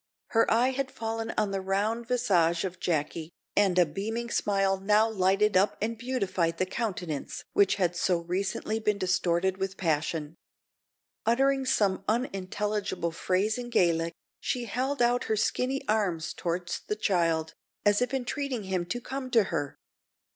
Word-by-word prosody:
Her 225 0 +3
eye 240 +3 +4
had 265 0 -2
fallen 225 -1 -3
on 210 -2 +1
the 195 -1 -1
round 210 +5 -1
visage 185 -10 +2
of 185 -1 -4
Jacky, 155 -1 -1 0.3
and 195 -3 +3
a 180 - +6
beaming 220 +9 -4
smile 195 -1 +1
now 210 +3 +4
lighted 200 0 +2
up 195 +3 +3
and 225 +3 -1
beautified 195 -9 -1
the 185 - +1
countenance 185 -7 -4
which 200 -1 +4
had 180 -3 0
so 175 +1 +2
recently 190 +5 -2
been 210 -2 +1
distorted 185 -1 +1
with 195 0 -3
passion. 155 -1 -1 0.9
Uttering 270 +3 +3
some 200 -7 +2
unintelligible 205 -5 -1
phrase 190 +7 0
in 240 0 -5
Gaelic, 170 -6 +2 0.2
she 245 -1 -2
held 255 +4 0
out 245 +1 +2
her 220 - 0
skinny 255 +5 0
arms 190 -7 0
towards 175 0 -3
the 210 - 0
child, 165 -6 +1 0.3
as 205 +2 +4
if 250 - +1
entreating 270 -2 -2
him 185 -2 -2
to 245 +7 -3
come 260 +1 -5
to 230 -3 +5
her. 145 -4 -2
200 Hz, 155 wpm, -28 LUFS, 180-230 Hz, 0.9 s, a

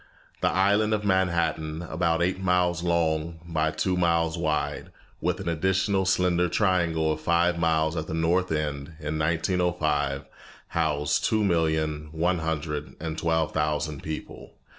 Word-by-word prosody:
The - - +3
island 105 +3 +3
of 105 -1 -4
Manhattan, 85 -4 0
about 85 0 0
eight 95 +1 0
miles 90 -2 +1
long 85 -1 0
by 80 -2 0
two 90 +4 -1
miles 85 -2 +2
wide, 80 -3 -2 0.3
with 90 +2 0
an 95 - -6
additional 95 +3 +1
slender 90 -2 +2
triangle 85 -5 +1
of 80 - -3
five 85 +1 +2
miles 80 -1 +1
at 80 -1 -3
the 80 - -3
north 85 +3 +1
end, 75 0 -2
in 75 0 -3
1905, 80 -4 0 0.4
housed 75 -3 0
two 110 -1 +2
million 80 -4 0
one 85 +2 +1
hundred 75 -2 -3
and 80 -1 -4
twelve 80 -1 0
thousand 75 -1 -1
people. 80 -1 -7
80 Hz, 140 wpm, -26 LUFS, 80-90 Hz, 0.4 s, The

